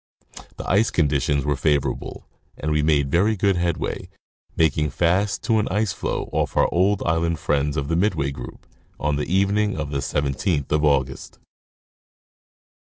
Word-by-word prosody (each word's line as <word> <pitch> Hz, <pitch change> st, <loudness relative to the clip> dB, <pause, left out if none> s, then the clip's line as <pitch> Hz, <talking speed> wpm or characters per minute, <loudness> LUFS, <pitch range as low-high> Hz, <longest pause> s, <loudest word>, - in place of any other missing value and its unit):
The -, -, -7 dB
ice 105 Hz, +4 st, +3 dB
conditions 70 Hz, -3 st, +1 dB
were 75 Hz, 0 st, +1 dB
favorable 70 Hz, -2 st, -1 dB, 0.3 s
and 75 Hz, -, -3 dB
we 75 Hz, 0 st, +2 dB
made 75 Hz, -3 st, +2 dB
very 100 Hz, +7 st, +3 dB
good 100 Hz, -1 st, +2 dB
headway, 85 Hz, -1 st, -2 dB, 0.5 s
making 75 Hz, -1 st, +2 dB
fast 90 Hz, +7 st, 0 dB
to 110 Hz, -3 st, +2 dB
an 105 Hz, -, 0 dB
ice 105 Hz, -1 st, 0 dB
floe, -, -, -3 dB
off -, -, -1 dB
our -, -, +5 dB
old 95 Hz, +3 st, +2 dB
island 85 Hz, 0 st, +1 dB
friends 75 Hz, 0 st, 0 dB
of 70 Hz, -1 st, -1 dB
the 80 Hz, -, 0 dB
midway 85 Hz, -7 st, +1 dB
group, 65 Hz, -3 st, -9 dB, 0.3 s
on 75 Hz, 0 st, 0 dB
the 75 Hz, -, -3 dB
evening 100 Hz, +1 st, +1 dB
of 75 Hz, -2 st, -4 dB
the 70 Hz, -, -1 dB
17th 70 Hz, +2 st, -1 dB
of 75 Hz, 0 st, +2 dB
August. 70 Hz, -3 st, 0 dB
80 Hz, 155 wpm, -23 LUFS, 70-95 Hz, 0.5 s, our